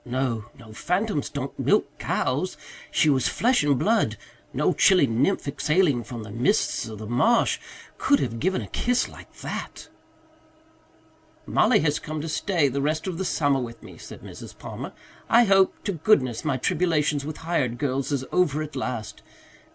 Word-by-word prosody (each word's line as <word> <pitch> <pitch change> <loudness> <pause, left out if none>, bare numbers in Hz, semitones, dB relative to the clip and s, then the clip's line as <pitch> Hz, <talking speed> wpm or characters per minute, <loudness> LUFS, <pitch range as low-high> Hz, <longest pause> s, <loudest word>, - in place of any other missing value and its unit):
No, 125 -3 -2
no, 115 -4 -13
phantoms 180 - -1
don't 140 -1 -5
milk - - +1
cows. - - -1 0.3
She - - +2
was 135 -4 +3
flesh 245 -2 +2
and 145 -2 +3
blood. 225 - +1 0.3
No - - +1
chilly 185 -7 +5
nymph 135 - 0
exhaling 150 -2 +1
from 115 0 -7
the 105 - -9
mists 120 - +1
of 110 -1 -8
the 110 - -7
marsh 125 - +2 0.4
could 280 - +3
have 115 - -2
given 185 +6 0
a - - -8
kiss 245 +1 +1
like - - -13
that." - - -6 1.6
"Mollie 225 - +3
has 150 -1 +1
come 155 0 -5
to 155 - -4
stay 170 -2 +1
the 140 +1 -2
rest 155 +2 -1
of 185 -3 -4
the - - 0
summer 145 -5 +1
with 115 -2 -7
me," - - -12
said - - -10
Mrs. - - -11
Palmer. - - -7 0.4
"I 235 +1 +6
hope 195 -3 +3
to 205 - -1
goodness 145 - +2
my 145 -4 0
tribulations 150 -1 +1
with 155 +1 -6
hired 150 -8 -1
girls 135 0 -1
is 135 -2 -1
over 155 -4 +2
at 150 -1 -9
last. 125 -5 -4
145 Hz, 170 wpm, -25 LUFS, 125-180 Hz, 1.6 s, I